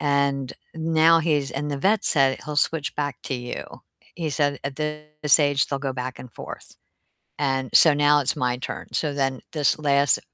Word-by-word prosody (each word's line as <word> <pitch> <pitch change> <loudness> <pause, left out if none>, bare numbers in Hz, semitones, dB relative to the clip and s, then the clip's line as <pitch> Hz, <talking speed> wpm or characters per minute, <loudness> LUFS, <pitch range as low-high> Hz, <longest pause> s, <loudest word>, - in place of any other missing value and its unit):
And 140 -2 0 0.2
now 165 0 +4
he's 150 -4 0
And 145 +2 -3
the 140 - -3
vet 205 +7 +2
said, 135 -3 +2
"He'll 150 -1 -5
switch 150 0 0
back 145 -1 -2
to 135 - -3
you." 125 -1 -5 0.5
He 165 -2 -3
said, 145 0 0
"At 140 0 -4
this 150 -1 +1
age 145 -2 +2
they'll 140 - -3
go 135 -1 -3
back 125 -1 -5
and 125 - -10
forth." - - -10 0.6
And 135 -2 -1
so 160 - +7
now 145 0 +4
it's 135 - 0
my 125 -1 -1
turn. 130 - -6
So 150 -3 -1
then 135 -2 -1
this 150 -3 +1
last, 140 -2 +2
145 Hz, 185 wpm, -24 LUFS, 135-150 Hz, 0.6 s, so